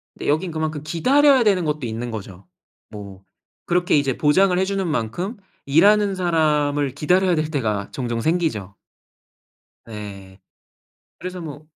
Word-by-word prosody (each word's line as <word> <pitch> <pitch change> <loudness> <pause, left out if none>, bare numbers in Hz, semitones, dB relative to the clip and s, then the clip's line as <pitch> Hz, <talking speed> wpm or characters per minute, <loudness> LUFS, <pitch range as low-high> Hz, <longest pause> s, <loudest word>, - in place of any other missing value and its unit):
근데 - - -7
여긴 165 +5 0
그만큼 155 -2 -3
기다려야 260 - +4
되는 195 -5 +2
것도 150 -3 -2
있는 115 +2 -5
거죠. 100 -4 -9 0.4
뭐 100 -3 -10 0.4
그렇게 175 0 +1
이제 135 -3 0
보장을 180 +5 +3
해 190 - +2
주는 195 -2 -2
만큼 175 - -3 0.3
일하는 200 +7 +4
사람을 150 -5 +1
기다려야 180 +6 +2
될 155 0 -2
때가 105 -8 -2
종종 120 -3 -3
생기죠. 155 - -1 1.1
예. 100 -3 -9 0.8
그래서 180 0 -6
뭐 155 -1 -9
155 Hz, 285 characters per minute, -21 LUFS, 115-180 Hz, 1.1 s, 기다려야